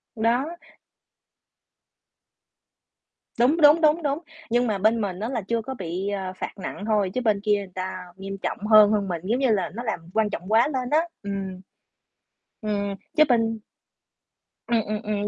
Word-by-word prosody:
Đó. 235 +5 +1 2.9
Đúng, 265 +7 +4
đúng, 300 +3 +7
đúng, 310 +2 +3
đúng. 285 +1 0 0.3
Nhưng 240 +1 +2
mà 210 -2 0
bên 220 +3 +2
mình 190 -3 -3
á, 220 +3 -3
là 240 -4 -2
chưa 230 +1 0
có 265 +4 -6
bị, 185 -1 -4
ờ, 190 -2 -3
phạt - - -5
nặng 200 +1 -6
thôi, 210 -4 +1
chứ 255 - -1
bên 210 -4 +1
kia 210 -1 +3
người 195 -2 -7
ta 185 0 -4
nghiêm 195 0 -6
trọng - - -3
hơn 215 -1 +8
hơn 205 -2 +1
mình, 175 -3 -3
giống 230 +6 +1
như 265 -3 +2
là 200 -4 +1
nó 235 - -5
làm 220 -7 -2
quan 220 -1 +2
trọng 185 0 -6
quá 230 +5 +5
lên 255 -4 -2
á, 305 +3 +4 0.2
ừm. 195 -2 -5 1.0
Ừm, 205 -2 -2 0.2
chứ 305 - +7
bên 225 -3 +1 1.1
Ừm, 235 -2 +2
ừm, 215 0 -3
ừm. 205 -1 -2
215 Hz, 175 wpm, -25 LUFS, 195-240 Hz, 2.9 s, hơn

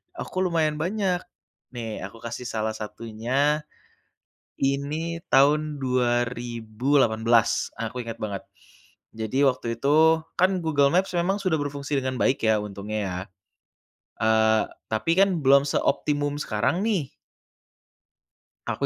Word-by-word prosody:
Aku 185 - -5
lumayan 155 -3 +1
banyak. 185 +1 0 0.6
Nih 115 -3 -5
aku 110 +4 -11
kasih 120 +1 -6
salah 110 -2 -2
satunya, 115 +8 -1 0.9
ini 150 +5 -1
tahun 150 +2 +4
2018, 120 -1 +1
aku 125 - -4
ingat 115 -1 -6
banget. 100 -3 -4 0.7
Jadi 110 +5 0
waktu 125 -3 0
itu 160 +3 +4 0.2
kan 185 0 +3
Google 145 -3 +3
Maps 185 +2 +2
memang 175 +3 +1
sudah 180 -5 +1
berfungsi 145 0 -3
dengan 130 0 -3
baik 130 -2 +1
ya 110 - +4
untungnya 105 +1 -5
ya, 90 -2 -3 1.1
eee, 110 0 +4 0.3
tapi 165 +10 +1
kan 195 -3 +3
belum 140 +1 +6
seoptimum 145 +1 0
sekarang 115 - 0
nih. 190 -11 0 1.6
Aku - - -1
135 Hz, 115 wpm, -25 LUFS, 115-155 Hz, 1.6 s, belum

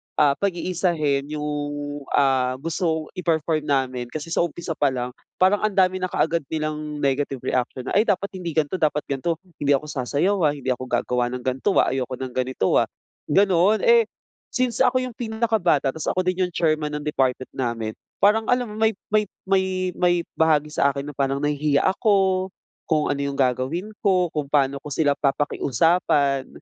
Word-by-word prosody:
ah, 145 -2 +4
pag-iisahin 170 -7 0
yung, 145 -1 -4
ah, 130 -2 +2
gustong 160 +2 -2
i-perform 160 -3 0
namin 130 -3 0
kasi 155 +5 -7
sa - - 0
umpisa 170 0 -2
pa 145 - +4
lang 125 -1 -2 0.2
parang 190 +3 +3
ang 215 -2 -1
dami 185 -1 +3
na 185 - -1
kaagad 165 -1 +1
nilang 155 -1 -4
negative 135 -1 0
reaction 125 0 -1
na, - - -5
ay 225 - +2
dapat 200 0 0
hindi 180 -4 -6
gan'to, 160 +3 0
dapat 150 -1 +1
gan'to. 140 +5 -1 0.2
Hindi 145 -1 +3
ako 145 +3 -3
sasayaw 150 +8 0
ah, 145 - +1
hindi 130 -2 -2
ako 130 0 -3
gagawa 120 0 0
ng 125 - -7
gan'to 130 +10 0
ah, - - +3
ayoko 130 -1 -2
ng 130 0 -6
ganito 130 -5 +1
ah, - - +1 0.4
ganon. 195 +4 +3
Eh, 470 -1 +5 0.5
since 255 -1 0
ako 255 0 +3
yung 255 - -4
pinakabata 220 - +1
tapos 160 +2 -6
ako 185 - 0
din 185 0 0
yung 180 - -14
chairman 155 -2 0
ng 150 - -4
department 130 -4 -1
namin 115 -3 -3 0.3
parang 220 +2 +4
alam 245 -3 +1
mo - - -8
may 220 -2 +2 0.2
may 210 0 +2 0.2
may 190 -1 0
may 175 -1 +3 0.2
bahagi 150 -2 +3
sa 140 -2 +2
akin 140 +1 -4
na - - -18
parang 135 +1 -1
nahihiya 145 -1 +1
ako, 190 -2 +2 0.4
kung 155 -2 +2
ano 140 - -2
'yong 140 0 -2
gagawin 135 - 0
ko. 185 -4 +2
Kung 150 -2 -3
paano 140 -1 +1
ko 150 - -9
sila 145 -1 +2
papakiusapan, 140 0 +1
150 Hz, 180 wpm, -23 LUFS, 140-185 Hz, 0.5 s, Eh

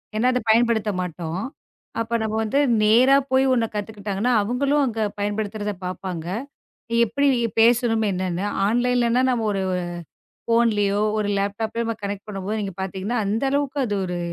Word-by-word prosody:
ஏன்னா 230 +4 +2
அத 250 - +1
பயன்படுத்த 225 -2 +3
மாட்டோம். 170 0 -4 0.6
அப்போ 230 +1 -1
நாம 220 0 -1
வந்து 220 +6 +1 0.2
நேரா 240 +6 +6 0.2
போய் 265 +1 +4
உன்ன 230 -2 +1
கத்துக்கிட்டாங்கன்னா, 210 +2 -2
அவுங்களும் 275 +7 +1
அங்க 225 -3 -2 0.2
பயன்படுத்துறத 205 0 -2
பாப்பாங்க. 180 -2 -5 0.7
எ - - +3
எப்பிடி 280 +6 +1 0.3
பேசணும் 230 -1 +3
என்னன்னு 185 0 -2 0.2
ஆன்லைன்ல 245 +2 +2
நாம 240 -3 0
ஒரு, 195 - -1
அ - - -1 0.7
ஃபோன்லயோ! 210 -3 +2 0.2
ஒருலேப்டாப்லயோ! 205 +3 -1
நம்ம 230 -1 -2
கனெக்ட் 200 +1 -5
பண்ணும் 195 -2 -6
போது 215 +2 -1
நீங்கப் 195 -2 -5
பாத்தீங்கன்னா, 195 +5 -3
அந்த 220 +6 0
அளவுக்கு 285 0 -1
அது 205 - -2
ஒரு 180 0 -3
220 Hz, 145 wpm, -23 LUFS, 200-240 Hz, 0.7 s, நேரா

